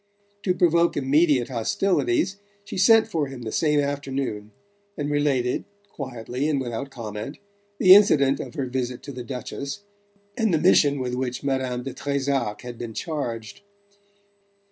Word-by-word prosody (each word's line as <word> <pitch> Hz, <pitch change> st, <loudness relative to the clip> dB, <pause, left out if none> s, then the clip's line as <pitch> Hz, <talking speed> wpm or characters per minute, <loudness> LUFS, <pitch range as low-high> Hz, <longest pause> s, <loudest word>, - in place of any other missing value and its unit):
To 180 Hz, -2 st, +2 dB
provoke 170 Hz, -1 st, +3 dB
immediate 140 Hz, -2 st, +3 dB
hostilities 195 Hz, -, 0 dB, 0.3 s
she -, -, -7 dB
sent 220 Hz, +4 st, +5 dB
for 155 Hz, -4 st, -1 dB
him 135 Hz, -3 st, -8 dB
the 110 Hz, -, -4 dB
same 150 Hz, -2 st, +2 dB
afternoon, 135 Hz, -7 st, -3 dB, 0.5 s
and 145 Hz, -1 st, -2 dB
related, 140 Hz, -4 st, +1 dB, 0.3 s
quietly 130 Hz, -, -4 dB
and 145 Hz, -3 st, +1 dB
without 120 Hz, +1 st, -4 dB
comment, 115 Hz, +1 st, -6 dB, 0.4 s
the 185 Hz, -2 st, +8 dB
incident 145 Hz, -10 st, +5 dB
of -, -, -7 dB
her 140 Hz, -4 st, -1 dB
visit 125 Hz, -1 st, -3 dB
to 140 Hz, -, -7 dB
the 125 Hz, -2 st, -7 dB
Duchess, 140 Hz, +7 st, -6 dB, 0.5 s
and 225 Hz, -3 st, +1 dB
the 165 Hz, -, +3 dB
mission 150 Hz, -3 st, +4 dB
with 125 Hz, -2 st, -3 dB
which 125 Hz, 0 st, -3 dB
Madame 130 Hz, -3 st, -1 dB
de 135 Hz, -, -5 dB
Trezac 140 Hz, -6 st, -1 dB
had 120 Hz, -1 st, -8 dB
been 115 Hz, -2 st, -6 dB
charged. 115 Hz, -10 st, -4 dB
140 Hz, 145 wpm, -24 LUFS, 125-155 Hz, 0.5 s, the